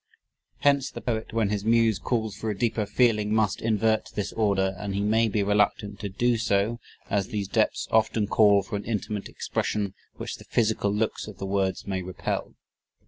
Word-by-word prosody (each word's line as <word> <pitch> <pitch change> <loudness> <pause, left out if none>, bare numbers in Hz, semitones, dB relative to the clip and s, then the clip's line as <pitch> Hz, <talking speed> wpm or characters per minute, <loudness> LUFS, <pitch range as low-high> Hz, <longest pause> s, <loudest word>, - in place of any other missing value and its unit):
Hence 140 -2 +3
the - - -8
poet 110 -2 -3
when 110 -2 +1
his 105 -1 -1
muse 115 -1 +3
calls 110 -5 -1
for 110 - -4
a 105 - -3
deeper 110 -2 0
feeling 105 -1 +2
must 110 -3 +1
invert 110 0 +1
this 105 - -2
order, 100 -3 +1
and 100 -2 -3
he 100 - 0
may 110 +2 +3
be 105 0 +1
reluctant 105 0 +1
to 100 - -4
do 120 +5 +1
so 110 +1 +1 0.3
as 100 -2 +1
these 100 -2 -3
depths - - +1
often 110 -1 +2
call 100 -1 +4
for 100 - -5
an 100 - -6
intimate 105 -2 -3
expression 100 -3 -2 0.2
which - - -5
the - - -13
physical 110 -3 +1
looks 105 +1 -1
of 105 -4 -9
the 95 - -5
words 95 -1 -1
may 95 -2 -2
repel. 90 0 -4
105 Hz, 190 wpm, -26 LUFS, 100-110 Hz, 0.3 s, call